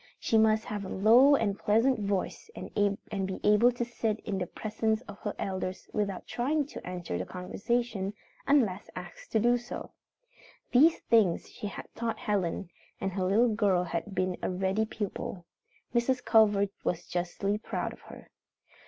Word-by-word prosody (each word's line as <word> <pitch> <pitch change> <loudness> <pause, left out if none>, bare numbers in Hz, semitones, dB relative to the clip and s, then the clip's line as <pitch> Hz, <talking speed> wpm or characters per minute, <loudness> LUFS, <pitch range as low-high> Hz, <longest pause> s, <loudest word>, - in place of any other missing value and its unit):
She - - 0
must 220 0 +4
have 205 -1 -4
a 190 - -6
low 240 +8 +6
and 205 -6 0
pleasant 230 +4 +3
voice 200 - -2
and - - -8 0.5
be 190 - -4
able 210 +4 +5
to 240 0 -3
sit 225 -2 -2
in 195 -3 -3
the 180 - -2
presence 220 +2 -1
of 205 -3 -11
her 210 - -4
elders 185 -1 -4
without 200 -3 -2
trying 285 +5 0
to - - -8
enter 175 - -4
the 95 - -3
conversation 200 +2 -2 0.3
unless 225 -9 +2
asked - - -9
to 220 - +4
do 240 +2 +3
so. 240 - -7 0.8
These 305 +6 +6
things 215 -7 +3
she 210 - -6
had - - -7
taught 230 -1 -2
Helen, 195 -3 -1 0.3
and 195 - -2
her 185 -1 -1
little 220 +5 +3
girl 200 -5 +2
had 180 +3 -4
been 185 -1 0
a - - -1
ready 190 +4 0
pupil. 200 -4 -5 0.5
Mrs. 245 +1 +1
Culver 205 -3 +5
was 170 - -1
justly 180 +4 -2
proud - - -3
of - - -16
her. - - -12
210 Hz, 165 wpm, -29 LUFS, 190-235 Hz, 0.8 s, low